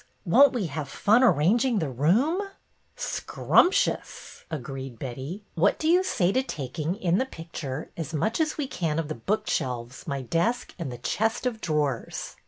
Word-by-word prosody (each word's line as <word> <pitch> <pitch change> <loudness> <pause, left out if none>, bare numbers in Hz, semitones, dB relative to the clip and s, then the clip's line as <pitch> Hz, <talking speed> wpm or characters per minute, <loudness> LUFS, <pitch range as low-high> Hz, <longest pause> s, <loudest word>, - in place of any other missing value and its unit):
''Won't 270 +9 +7
we 235 -6 -1
have 150 -2 -4
fun 215 - +3
arranging 225 - +4
the 155 -8 -1
room! 215 - +2 0.2
" - - -42
" - - -42 0.2
Scrumptious! 390 +8 +1
" - - -39
agreed 135 -4 -6
Betty. 135 - -6
" - - -40
What 180 +5 +3
do 315 - -2
you 340 +2 +6
no - - +3
BETTY 375 - -2
BAIRD'S - - -2
VENTURES 185 -2 +2
say 260 - +4
to 265 - -12
taking, 155 +4 -3
in 180 -4 +1
the 260 - +1
picture, 160 - -6
as 160 -3 -5
much 215 - 0
as 310 -1 0
we 295 - -1
can 165 - -2
of 160 -2 -2
the - - -1
book 195 - -2
shelves, 125 +1 -3
my 140 -3 -2
desk 170 - 0
and 155 -6 -4
the 120 - -6
chest 220 - -1
of 230 -3 -2
drawers? 150 -6 -2
170 Hz, 205 wpm, -26 LUFS, 140-235 Hz, 0.2 s, Won't